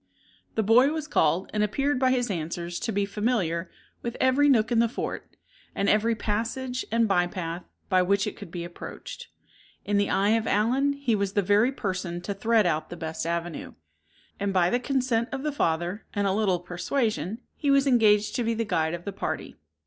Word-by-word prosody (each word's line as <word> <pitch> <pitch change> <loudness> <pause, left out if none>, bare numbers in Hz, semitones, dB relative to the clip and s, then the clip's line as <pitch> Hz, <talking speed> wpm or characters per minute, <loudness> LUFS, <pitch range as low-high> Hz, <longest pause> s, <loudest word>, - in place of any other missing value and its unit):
The 220 - +1
boy 230 +6 +6
was 315 -1 -3
called, 165 - +1
and 210 - +1
appeared 275 +6 +1
by 260 -1 +3
his 245 -3 +1
answers 170 0 -4
to 225 - -2
be 200 -1 0
familiar 195 -5 -1 0.3
with 235 0 -4
every 265 +3 +4
nook 230 -3 +3
in 235 - +3
the 230 0 +3
fort, - - -5 0.4
and 200 - 0
every 225 +2 +3
passage 235 +5 -2
and 230 0 +3
by 180 -3 +2
path 175 -1 -5 0.2
by 185 -2 +3
which 200 +2 +2
it - - -4
could 200 - -10
be 175 0 -5
approached. 175 0 -8 0.6
In 205 0 +1
the 200 - +1
eye 200 +1 +2
of 225 0 +2
Allen, 255 +7 +2
he 280 -4 -1
was 200 -2 0
the 205 - +2
very 205 +6 +3
person 185 -7 -3
to 200 +3 -3
thread 220 +1 +2
out 155 -3 0
the 175 - -7
best 160 0 -4
avenue; 170 -1 -3 0.7
and 200 0 0
by 180 -2 +3
the 245 - +2
consent 250 -3 0
of 270 0 -4
the 300 - 0
father, 175 - -1
and 205 0 +1
a 195 - +2
little 200 -3 +2
persuasion, 195 - -2 0.2
he 285 - -1
was 275 0 +4
engaged 215 -5 +4
to 245 - 0
be 230 0 0
the 230 +1 -1
guide 160 -4 0
of 175 - -10
the 200 - -4
party. 200 - -4
210 Hz, 200 wpm, -26 LUFS, 180-240 Hz, 0.7 s, boy